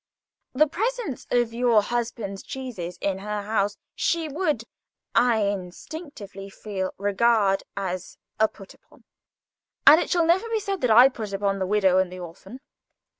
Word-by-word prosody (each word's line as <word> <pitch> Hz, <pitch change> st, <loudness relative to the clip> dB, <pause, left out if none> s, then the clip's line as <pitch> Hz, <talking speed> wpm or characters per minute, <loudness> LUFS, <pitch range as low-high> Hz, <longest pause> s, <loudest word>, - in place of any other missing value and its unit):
The 300 Hz, +4 st, +5 dB
presence 440 Hz, -, -3 dB
of 240 Hz, -2 st, +1 dB
your 235 Hz, -3 st, +3 dB
husband's 230 Hz, -4 st, -3 dB
cheeses 225 Hz, -10 st, -6 dB
in 195 Hz, -1 st, -1 dB
her 210 Hz, +1 st, -4 dB
house 205 Hz, -1 st, 0 dB, 0.2 s
she 335 Hz, -1 st, 0 dB
would, 300 Hz, -, -1 dB, 0.5 s
I 235 Hz, -2 st, +3 dB
instinctively 200 Hz, -, -6 dB
feel, 195 Hz, -2 st, -4 dB
regard 205 Hz, 0 st, +2 dB, 0.2 s
as 185 Hz, -2 st, -4 dB, 0.2 s
a 220 Hz, -, +5 dB
'put 195 Hz, -2 st, -14 dB
upon'; -, -, -24 dB, 0.8 s
and 305 Hz, +4 st, +9 dB
it -, -, -3 dB
shall 345 Hz, -2 st, +3 dB
never 375 Hz, +7 st, +2 dB
be 450 Hz, -1 st, 0 dB
said 395 Hz, -2 st, -3 dB
that 250 Hz, -, +2 dB
I 240 Hz, +4 st, +8 dB
put 220 Hz, -6 st, -6 dB
upon 195 Hz, 0 st, 0 dB
the 190 Hz, -, -1 dB
widow 190 Hz, -2 st, +3 dB
and 190 Hz, -1 st, 0 dB
the 185 Hz, -, -8 dB
orphan." 185 Hz, +8 st, -10 dB
215 Hz, 155 wpm, -25 LUFS, 195-265 Hz, 0.8 s, and